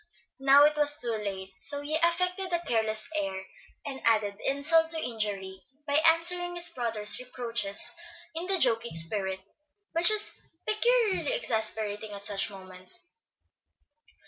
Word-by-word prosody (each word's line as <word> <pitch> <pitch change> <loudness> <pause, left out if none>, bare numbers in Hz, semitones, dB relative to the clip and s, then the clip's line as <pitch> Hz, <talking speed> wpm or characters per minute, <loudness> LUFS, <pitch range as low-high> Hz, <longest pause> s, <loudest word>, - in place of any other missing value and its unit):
Now 275 +1 +6
it 300 0 +2
was 295 0 +4
too 240 -4 +1
late; 195 -3 -5
so 285 0 +4
he 295 +2 -3
affected 360 +3 0
a 345 0 -1
careless 220 -3 -1
air, 190 -9 -3 0.4
and 270 -2 -6
added 210 -3 +1
insult 320 +4 +2
to 325 - -3
injury 205 -7 -4 0.2
by 285 -1 +1
answering 350 +2 +1
his 345 0 +4
brother's 230 -7 -1
reproaches 235 -5 +1 0.4
in 335 +3 -6
the 385 0 +3
joking 235 - +1
spirit 190 +3 -1 0.5
which 335 +3 +5
is 425 -1 +4 0.3
peculiarly 460 0 +1
exasperating 220 - -2
at 200 0 -9
such 200 -1 +1
moments. 190 - -10
250 Hz, 135 wpm, -27 LUFS, 210-335 Hz, 0.5 s, Now